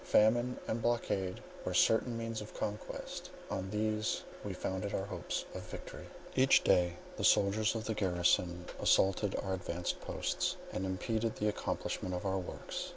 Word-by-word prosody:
Famine 120 +4 +4
and 115 +1 -1
blockade 100 -6 0 0.2
were - - -2
certain 115 +1 +4
means 115 -1 -3
of 105 - -9
conquest; 105 0 -4 0.2
and - - 0
on - - -6
these 110 +1 0 0.2
we - - -3
founded 95 +2 -2
our 95 - -1
hopes 100 - -3
of - - -5
victory. - - -8 0.3
Each 130 +1 +6
day 90 -1 +4 0.2
the - - -3
soldiers 105 +3 +4
of 110 0 -3
the 110 - 0
garrison 90 -2 +2
assaulted 95 +1 +3
our 95 -1 -1
advanced 90 -1 -2
posts, - - -1 0.2
and 95 +1 -1
impeded 110 +4 -1
the 105 - 0
accomplishment 90 -2 -2
of 90 - -4
our 95 0 +1
works. 90 - -5
105 Hz, 160 wpm, -34 LUFS, 95-110 Hz, 0.3 s, Each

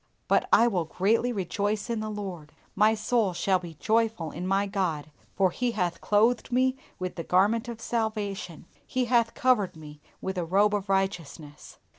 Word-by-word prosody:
But - - +2
I 235 - +6
"will 185 -8 0
greatly 220 +9 +1
rejoice 205 +1 -2
in 235 -2 -2
the 215 0 -4
Lord, 185 -8 -6 0.2
my 215 +2 +4
soul 220 -3 +1
shall 185 +2 +1
be 170 -2 -9
joyful 220 -4 0
in 180 +3 -5
my 195 +1 +2
God, 165 -7 -2 0.2
for 190 -2 +3
He 245 +4 -1
hath 180 -5 -2
clothed 225 +5 +2
me 255 +1 +2 0.2
with 185 0 -5
the 165 - -3
garments 210 +8 +2
of 235 -1 -6
salvation, 215 -8 -3 0.2
He 255 -1 0
hath 235 -1 +2
covered 240 -9 +2
me 150 -1 -12 0.2
with 190 -1 -3
a - - -1
robe 200 +5 +3
of 205 -1 -2
righteousness." 170 -6 -3
200 Hz, 175 wpm, -27 LUFS, 180-225 Hz, 0.2 s, I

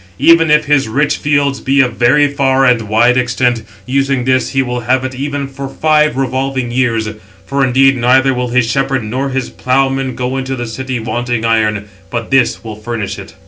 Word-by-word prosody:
Even 165 - +4
if 150 0 +4
his 145 -4 +2
rich 145 +6 0
fields 145 -1 0
be 135 +1 +1
of 125 -3 +3
very 135 +5 +3
far 135 -2 +1
and 115 -4 +1
wide 120 +3 +3
extent, 125 -1 0 0.2
using 135 0 0
this 130 0 +1
he 135 -1 0
will 125 -1 -3
have 130 +2 0
it 130 - -4
even 140 +1 -4
for 135 0 -7
five 150 -2 +1
revolving 130 -1 -2
years; 120 -3 0 0.4
for 140 +5 0
indeed 135 +1 +3
neither 130 +2 +3
will 125 0 -2
his 125 0 +2
shepherd 135 0 -1
nor 130 +6 -3
his 135 -2 -3
ploughman 135 0 -1
go 125 +1 -3
into 135 0 -3
the 120 -1 -4
city 130 +2 -4
wanting 120 +1 -3
iron, 110 -2 +1 0.2
but 115 -1 -5
[this] 135 -3 +2
will 110 -2 -7
furnish 110 -1 -5
it." - - -11
130 Hz, 190 wpm, -14 LUFS, 120-135 Hz, 0.4 s, Even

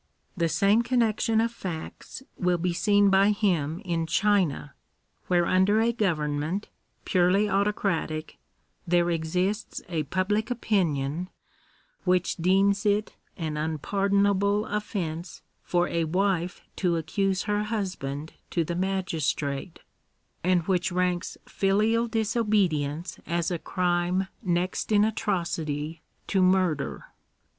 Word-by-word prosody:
The 170 -3 +1
some 205 +6 +3
connection 230 -2 +1
of 230 +1 +1
facts 185 +4 -7
will 180 -1 +1
be 175 +1 -1
seen 205 +2 +3
by 195 +1 +5
him 185 -5 0
in 165 -2 -1
China, 180 -6 +1 0.5
where 175 -1 +3
under 190 +4 +3
a 230 +1 +3
government, 165 -3 -1 0.4
purely 185 +3 +3
autocratic, 195 -6 -1 0.5
there 175 0 +3
exists 180 +6 -1
a 170 -3 -1
public 190 - -1
opinion 180 - 0 0.7
which 180 0 +1
deems 195 +3 +3
it 210 0 +1 0.2
an 155 -4 -3
unpardonable 200 +6 +1
offence 185 -5 -4 0.2
for 175 0 +1
a 170 -1 0
wife 180 +1 0 0.2
to 175 -3 +1
accuse 190 +4 0
her 210 0 0
husband 180 -9 -4 0.2
to 170 - 0
the 170 - -3
magistrate, 170 -5 -2 0.6
and 180 -1 +3
which 185 +1 0
ranks 180 0 -1
filial 215 +4 +1
disobedience 205 -9 0
as 170 +1 0
a 175 - -1
crime 180 +2 0
next 180 +3 -1
in 205 -1 +5
atrocity 165 -7 -2 0.2
to 195 - +1
murder. 185 -6 +1
185 Hz, 115 wpm, -27 LUFS, 165-205 Hz, 0.7 s, by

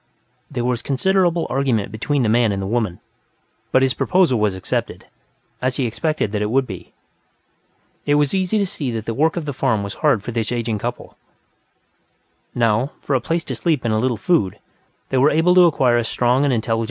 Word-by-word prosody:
There 120 -3 -3
was 125 -1 0
considerable 175 +4 +1
argument 125 -7 0
between 130 +6 -1
the - - +1
man 115 -1 +3
and 100 - -2
the 95 - -3
woman, 110 -4 -1 0.7
but 130 - +4
his 130 -1 +2
proposal 175 -10 +2
was 105 -3 +1
accepted, 95 - -4 0.6
as 130 0 0
he 135 - 0
expected 135 0 -1
that 105 -1 -2
it 105 - -1
would. 130 +2 +1 1.4
It 145 - +3
was 145 -1 +2
easy 190 +2 +1
to 200 - +2
see 155 -8 -4
that 115 -2 -4
the 115 - -2
work 155 +7 +1
of 165 - -3
the 145 - -3
farm 120 -6 0
was 100 - -5
hard 145 -10 +1
for 120 - -5
this 115 -1 -2
aging 115 -3 -2
couple; 120 +3 -6 1.4
now, 115 +3 +1
for 140 - -2
a 130 - +2
place 165 0 -1
to - - -4
sleep 155 -8 0
and 110 - +1
a 110 - +1
little 125 0 0
food, 145 - +1 0.5
they 130 - +1
were 140 +3 +5
able 165 +4 +3
to 180 -1 +7
acquire 125 -6 +2
a - - 0
strong 125 +4 +1
and 140 - +2
intelligent 115 -2 -1
slave. 115 - +2
125 Hz, 205 wpm, -20 LUFS, 115-150 Hz, 1.4 s, to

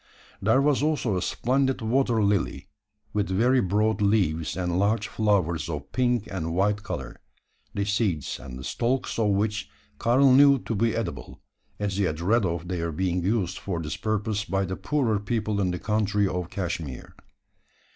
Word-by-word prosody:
There 110 +7 +3
was 145 -2 +2
also 145 -9 0
a 90 - -1
splendid 130 +6 0
water 120 -1 +1
lily 100 -2 0 0.5
with 105 -1 0
very 125 +7 +3
broad 105 +3 +1
leaves 90 -5 +1
and 90 -1 -1
large 105 +2 +1
flowers 95 -7 0
of 75 -3 -5
pink 120 -4 +1
and 85 -3 -3
white 100 +2 +1
colour 100 - -6 0.6
the 100 - 0
seeds 100 - -1
and 65 -2 -9
the 65 - -8
stalks 120 - -1
of 110 - +3
which 100 -6 0 0.3
Karl 130 +3 +4
knew 140 +1 +7
to 120 - -4
be 115 +2 +1
edible; 110 -7 -5 0.4
as 100 -2 -2
he 100 - +2
had 80 -3 -2
read 105 +5 +2
of 85 0 -3
their 85 -2 -2
being 90 +2 -1
used 95 -1 -1
for 90 -4 -3
this 75 -2 -4
purpose 105 0 -1
by 95 +1 -1
the 95 +1 -4
poorer 120 -7 0
people 105 0 -1
in 95 - +1
the 90 - -2
country 105 -1 +1
of 90 -2 -3
Cashmeer. 85 -9 -5
100 Hz, 170 wpm, -26 LUFS, 90-115 Hz, 0.6 s, knew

